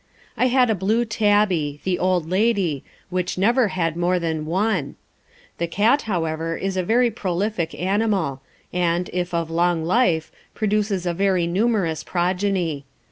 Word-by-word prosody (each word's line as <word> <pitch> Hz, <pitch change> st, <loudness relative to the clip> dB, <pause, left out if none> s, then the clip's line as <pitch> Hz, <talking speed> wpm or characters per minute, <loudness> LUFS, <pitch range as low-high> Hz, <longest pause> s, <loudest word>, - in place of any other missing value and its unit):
I 255 Hz, -, +2 dB
had 250 Hz, -2 st, +3 dB
a -, -, +3 dB
blue 215 Hz, +5 st, +1 dB
tabby, 205 Hz, -9 st, +1 dB
"The 185 Hz, -1 st, -1 dB
Old 180 Hz, -3 st, +1 dB
Lady," 190 Hz, -, +1 dB, 0.3 s
which 180 Hz, 0 st, -2 dB
never 235 Hz, +5 st, +3 dB
had 165 Hz, -4 st, -1 dB
more 175 Hz, +1 st, +1 dB
than 160 Hz, -3 st, -2 dB
one. 185 Hz, -4 st, 0 dB, 0.6 s
The 170 Hz, -, 0 dB
cat, 220 Hz, -, +2 dB
however, 165 Hz, -2 st, -1 dB
is 195 Hz, 0 st, -3 dB
a 185 Hz, -, +1 dB
very 235 Hz, +6 st, +2 dB
prolific 190 Hz, -3 st, -2 dB
animal, 190 Hz, -7 st, 0 dB, 0.3 s
and, 175 Hz, 0 st, 0 dB
if 180 Hz, 0 st, -2 dB
of 165 Hz, -1 st, -2 dB
long 170 Hz, -1 st, +1 dB
life, 175 Hz, -5 st, +2 dB, 0.2 s
produces 205 Hz, -3 st, 0 dB
a 175 Hz, -, 0 dB
very 185 Hz, -1 st, +1 dB
numerous 185 Hz, -3 st, 0 dB
progeny. 180 Hz, -4 st, -1 dB
185 Hz, 145 wpm, -22 LUFS, 170-210 Hz, 0.6 s, had